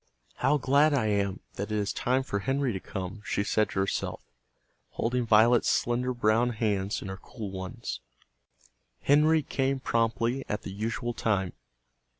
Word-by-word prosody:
"How 135 Hz, +4 st, +3 dB
glad 145 Hz, +3 st, +4 dB
I 125 Hz, -6 st, +1 dB
am 100 Hz, -2 st, 0 dB, 0.2 s
that 100 Hz, +2 st, -3 dB
it 105 Hz, -, 0 dB
is 100 Hz, -1 st, -1 dB
time 130 Hz, +2 st, +1 dB
for 100 Hz, -6 st, -2 dB
Henry 135 Hz, +2 st, 0 dB
to 95 Hz, -, -3 dB
come!" 95 Hz, +3 st, -6 dB
she 100 Hz, -, -1 dB
said 110 Hz, +1 st, +1 dB
to -, -, -2 dB
herself, 95 Hz, -, -2 dB, 0.7 s
holding 120 Hz, 0 st, -1 dB
Violet's 115 Hz, +2 st, +5 dB
slender 125 Hz, +1 st, +1 dB
brown 120 Hz, 0 st, +2 dB
hands 105 Hz, -3 st, -1 dB
in -, -, -6 dB
her 95 Hz, 0 st, -5 dB
cool 105 Hz, -5 st, -7 dB
ones. 95 Hz, -1 st, -5 dB, 1.0 s
Henry 155 Hz, +2 st, +4 dB
came 135 Hz, 0 st, 0 dB
promptly 115 Hz, +2 st, 0 dB
at 105 Hz, -, -2 dB
the -, -, -6 dB
usual 115 Hz, +3 st, -2 dB
time. 95 Hz, -6 st, 0 dB
115 Hz, 155 wpm, -28 LUFS, 100-130 Hz, 1.0 s, Violet's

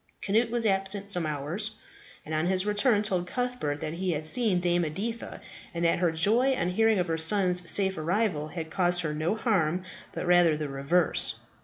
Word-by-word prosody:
Cnut 225 Hz, +4 st, +1 dB
was 235 Hz, 0 st, -2 dB
absent 195 Hz, 0 st, 0 dB
some 175 Hz, -4 st, +1 dB
hours, 160 Hz, +9 st, -3 dB, 0.5 s
and 155 Hz, -, -7 dB
on 155 Hz, +2 st, 0 dB
his 185 Hz, +1 st, +1 dB
return 210 Hz, +1 st, +2 dB
told 185 Hz, -4 st, -2 dB
Cuthbert 245 Hz, -12 st, -3 dB
that 155 Hz, -, -4 dB
he 180 Hz, +1 st, -2 dB
had 155 Hz, 0 st, -5 dB
seen 210 Hz, +1 st, +1 dB
Dame 175 Hz, 0 st, 0 dB
Editha, 205 Hz, +9 st, -5 dB, 0.3 s
and 170 Hz, 0 st, -1 dB
that 170 Hz, -, +2 dB
her 175 Hz, -2 st, +1 dB
joy 225 Hz, +11 st, +2 dB
on 175 Hz, -7 st, -2 dB
hearing 225 Hz, +3 st, +2 dB
of 180 Hz, -, 0 dB
her 165 Hz, -2 st, -3 dB
son's 180 Hz, 0 st, +4 dB
safe 190 Hz, -3 st, +3 dB
arrival 170 Hz, -2 st, -1 dB
had 160 Hz, 0 st, -7 dB
caused 180 Hz, -1 st, +1 dB
her 155 Hz, -3 st, -3 dB
no 155 Hz, +7 st, -2 dB
harm, 185 Hz, -7 st, 0 dB, 0.3 s
but -, -, -6 dB
rather 175 Hz, -3 st, +4 dB
the 150 Hz, -1 st, -5 dB
reverse. 140 Hz, +6 st, +1 dB
180 Hz, 190 wpm, -27 LUFS, 160-210 Hz, 0.5 s, son's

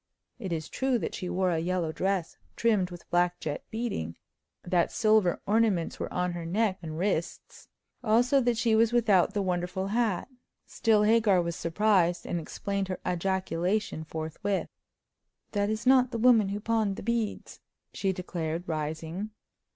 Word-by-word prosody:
It 190 Hz, -6 st, -5 dB
is 160 Hz, -2 st, -2 dB
true 265 Hz, -2 st, 0 dB
that -, -, -4 dB
she 180 Hz, -2 st, -4 dB
wore 185 Hz, 0 st, +1 dB
a 165 Hz, -, +1 dB
yellow 175 Hz, -1 st, -1 dB
dress 190 Hz, 0 st, -1 dB, 0.2 s
trimmed 210 Hz, -6 st, +2 dB
with 175 Hz, -1 st, -11 dB
black 175 Hz, 0 st, +2 dB
jet 150 Hz, -, -4 dB
beading; 220 Hz, -, -3 dB, 0.5 s
that 175 Hz, -1 st, +1 dB
silver 215 Hz, -5 st, +2 dB
ornaments 210 Hz, -5 st, +1 dB
were -, -, -4 dB
on 180 Hz, 0 st, 0 dB
her 175 Hz, -1 st, -5 dB
neck 190 Hz, +3 st, 0 dB
and 155 Hz, -2 st, -6 dB
wrists; 175 Hz, -2 st, -3 dB, 0.4 s
also 245 Hz, +5 st, +4 dB
that 240 Hz, -2 st, +1 dB
she 225 Hz, -1 st, +2 dB
was 225 Hz, +1 st, +4 dB
without 210 Hz, -5 st, +3 dB
the 205 Hz, -, +1 dB
wonderful 180 Hz, +1 st, -2 dB
hat. 220 Hz, -3 st, 0 dB, 0.4 s
Still, 220 Hz, -2 st, +2 dB
Hagar 215 Hz, -3 st, +4 dB
was 170 Hz, -1 st, -1 dB
surprised, 175 Hz, -1 st, +2 dB
and 175 Hz, -, -2 dB
explained 195 Hz, +4 st, -3 dB
her 185 Hz, -, -4 dB
ejaculation 185 Hz, 0 st, -1 dB
forthwith. 160 Hz, +5 st, -3 dB, 0.8 s
"That 205 Hz, -1 st, 0 dB
is 215 Hz, +2 st, -2 dB
not 255 Hz, -1 st, +5 dB
the 240 Hz, -, -3 dB
woman 225 Hz, -4 st, +5 dB
who 200 Hz, +1 st, -3 dB
pawned 220 Hz, -2 st, 0 dB
the -, -, -8 dB
beads!" 230 Hz, -1 st, -2 dB, 0.3 s
she 195 Hz, -, 0 dB
declared, 175 Hz, -2 st, -4 dB
rising. 160 Hz, +5 st, -3 dB
190 Hz, 160 wpm, -28 LUFS, 175-220 Hz, 0.8 s, not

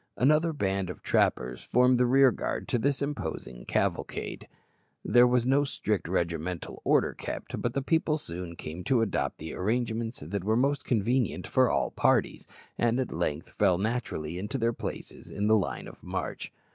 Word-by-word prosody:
Another 155 Hz, +5 st, +4 dB
band 95 Hz, -, -1 dB
of 90 Hz, -, -8 dB
trappers 60 Hz, +1 st, +1 dB
formed 125 Hz, 0 st, +3 dB
the 125 Hz, -, +4 dB
rear 135 Hz, +1 st, +6 dB
guard -, -, -3 dB
to 120 Hz, -, +1 dB
this 140 Hz, +3 st, 0 dB
imposing 135 Hz, -, -5 dB
cavalcade. -, -, -2 dB, 0.6 s
There 120 Hz, 0 st, +6 dB
was 125 Hz, -1 st, +2 dB
no 135 Hz, +3 st, +4 dB
strict 105 Hz, -, -2 dB
regimental 85 Hz, -1 st, -2 dB
order -, -, +3 dB
kept, -, -, -6 dB
but 120 Hz, 0 st, -2 dB
the 140 Hz, -, 0 dB
people 160 Hz, +1 st, +2 dB
soon 85 Hz, -, -6 dB
came 80 Hz, +3 st, -7 dB
to 125 Hz, -4 st, +3 dB
adopt 75 Hz, -10 st, -1 dB
the 80 Hz, 0 st, -7 dB
arrangements 115 Hz, +3 st, -1 dB
that 90 Hz, +6 st, -4 dB
were 110 Hz, +3 st, +2 dB
most 140 Hz, +3 st, +1 dB
convenient 120 Hz, 0 st, 0 dB
for -, -, +3 dB
all -, -, 0 dB
parties, -, -, +1 dB, 0.3 s
and 120 Hz, +1 st, +2 dB
at 130 Hz, -, -2 dB
length -, -, -2 dB
fell 95 Hz, -4 st, +3 dB
naturally 95 Hz, -7 st, -2 dB
into 105 Hz, +7 st, -3 dB
their 115 Hz, -1 st, +1 dB
places -, -, -7 dB
in 100 Hz, -, -2 dB
the 110 Hz, +1 st, +5 dB
line 75 Hz, -, -1 dB
of -, -, -13 dB
march. -, -, -4 dB
115 Hz, 170 wpm, -28 LUFS, 90-130 Hz, 0.6 s, rear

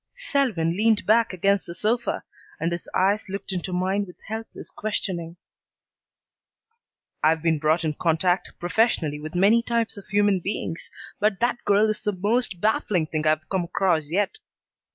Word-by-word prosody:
Selwyn 260 Hz, -, 0 dB
leaned 220 Hz, +1 st, +2 dB
back 230 Hz, +2 st, +4 dB
against 195 Hz, +2 st, +1 dB
the 170 Hz, -, -6 dB
sofa, 235 Hz, +4 st, -1 dB, 0.4 s
and 165 Hz, -, -1 dB
his 170 Hz, 0 st, -5 dB
eyes 200 Hz, +2 st, +1 dB
looked 195 Hz, +1 st, -4 dB
into 185 Hz, 0 st, -3 dB
mine 190 Hz, +3 st, 0 dB
with 180 Hz, -, -12 dB
helpless 220 Hz, +1 st, -7 dB
questioning. 175 Hz, -6 st, -3 dB, 1.9 s
"I've 160 Hz, +1 st, +3 dB
been 160 Hz, -2 st, +2 dB
brought 160 Hz, +2 st, +2 dB
in 155 Hz, -, 0 dB
contact 175 Hz, +4 st, +1 dB
professionally 175 Hz, -5 st, +1 dB
with 155 Hz, +3 st, -7 dB
many 205 Hz, +6 st, +5 dB
types 230 Hz, -2 st, 0 dB
of 200 Hz, -, -11 dB
human 205 Hz, -1 st, +3 dB
beings, 175 Hz, -3 st, -4 dB, 0.3 s
but 210 Hz, -2 st, +1 dB
that 240 Hz, 0 st, 0 dB
girl 205 Hz, +2 st, +4 dB
is 215 Hz, -, -1 dB
the 210 Hz, -, -1 dB
most 205 Hz, +1 st, 0 dB
baffling 200 Hz, -4 st, +1 dB
thing 155 Hz, 0 st, -2 dB
I've 155 Hz, 0 st, +1 dB
come 185 Hz, -3 st, -1 dB
across 170 Hz, -4 st, +1 dB
yet. 195 Hz, +4 st, 0 dB
190 Hz, 155 wpm, -24 LUFS, 170-215 Hz, 1.9 s, many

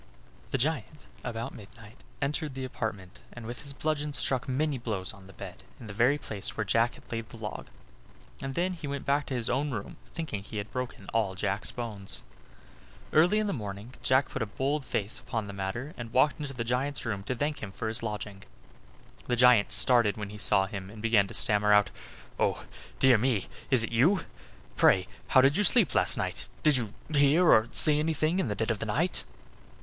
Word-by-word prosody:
The -, -, 0 dB
giant, 150 Hz, +2 st, -2 dB, 0.2 s
about 115 Hz, -1 st, -4 dB
midnight, 110 Hz, +2 st, -13 dB, 0.3 s
entered 150 Hz, 0 st, -2 dB
the 130 Hz, -1 st, -4 dB
apartment, 110 Hz, -4 st, -5 dB
and 120 Hz, -2 st, -9 dB
with 120 Hz, +2 st, -6 dB
his 140 Hz, -, -7 dB
bludgeon 150 Hz, +1 st, -2 dB
struck 130 Hz, -2 st, 0 dB
many 140 Hz, +1 st, 0 dB
blows 105 Hz, -6 st, -3 dB
on 100 Hz, -3 st, -15 dB
the -, -, -12 dB
bed, -, -, -9 dB, 0.2 s
in -, -, -10 dB
the 105 Hz, -, -7 dB
very 120 Hz, +7 st, +3 dB
place 105 Hz, -8 st, -4 dB
where 105 Hz, -, +1 dB
Jack 115 Hz, +4 st, +2 dB
had -, -, -17 dB
laid 115 Hz, -1 st, -4 dB
the 115 Hz, -, -11 dB
log; 105 Hz, -, -6 dB, 0.7 s
and 135 Hz, 0 st, -4 dB
then 180 Hz, +2 st, 0 dB
he 165 Hz, -4 st, -7 dB
went 140 Hz, -1 st, -4 dB
back 140 Hz, +1 st, +1 dB
to 135 Hz, -, -3 dB
his 120 Hz, -2 st, +3 dB
own 140 Hz, +4 st, 0 dB
room, 110 Hz, -7 st, -5 dB
thinking 155 Hz, -, -5 dB
he 105 Hz, +2 st, -8 dB
had 100 Hz, +1 st, -5 dB
broken 125 Hz, -5 st, -5 dB
all 105 Hz, -4 st, +1 dB
Jack's 100 Hz, +2 st, -1 dB
bones. 105 Hz, -5 st, -5 dB, 0.9 s
Early 175 Hz, +7 st, +5 dB
in 215 Hz, -, +1 dB
the 200 Hz, -, -1 dB
morning 105 Hz, 0 st, -6 dB
Jack 130 Hz, +1 st, +3 dB
put -, -, -4 dB
a 115 Hz, -, -1 dB
bold 135 Hz, +6 st, -1 dB
face 105 Hz, -1 st, -2 dB
upon 110 Hz, -4 st, -3 dB
the 100 Hz, -, -7 dB
matter, 115 Hz, +10 st, -4 dB
and 120 Hz, -2 st, -7 dB
walked 140 Hz, +4 st, +3 dB
into 145 Hz, -2 st, -4 dB
the 120 Hz, -, -2 dB
giant's 125 Hz, +3 st, -1 dB
room 105 Hz, -4 st, -2 dB
to 125 Hz, -, -2 dB
thank 145 Hz, +4 st, -2 dB
him 100 Hz, -, -5 dB
for 110 Hz, -, -4 dB
his 110 Hz, 0 st, -1 dB
lodging. 105 Hz, -3 st, -5 dB, 0.9 s
The 120 Hz, -, +1 dB
giant 125 Hz, -3 st, +6 dB
started 120 Hz, -5 st, +3 dB
when 105 Hz, -1 st, -5 dB
he 105 Hz, -, -9 dB
saw 95 Hz, -1 st, +4 dB
him, 95 Hz, -2 st, -6 dB
and 110 Hz, +1 st, -11 dB
began 110 Hz, -3 st, +4 dB
to -, -, -7 dB
stammer 105 Hz, 0 st, +3 dB
out: 105 Hz, 0 st, +4 dB, 0.5 s
"Oh! -, -, 0 dB, 0.3 s
dear 130 Hz, -4 st, +5 dB
me; 115 Hz, -4 st, +1 dB, 0.2 s
is 130 Hz, -4 st, +6 dB
it 115 Hz, -, -3 dB
you? 160 Hz, -, +4 dB, 0.5 s
Pray 95 Hz, -1 st, +4 dB, 0.2 s
how 130 Hz, -, +6 dB
did 135 Hz, +2 st, +4 dB
you 205 Hz, -, +3 dB
sleep 190 Hz, -, +5 dB
last -, -, +2 dB
night? -, -, -3 dB
Did 150 Hz, -2 st, +5 dB
you 115 Hz, -5 st, -3 dB, 0.2 s
hear 145 Hz, +5 st, +5 dB
or 110 Hz, +1 st, +5 dB
see 150 Hz, -1 st, +5 dB
anything 160 Hz, +3 st, +1 dB
in 185 Hz, -, 0 dB
the 105 Hz, -, -2 dB
dead 110 Hz, +3 st, 0 dB
of 110 Hz, -, -2 dB
the 110 Hz, -, -4 dB
night?" 160 Hz, -, +1 dB
120 Hz, 210 wpm, -29 LUFS, 105-140 Hz, 0.9 s, giant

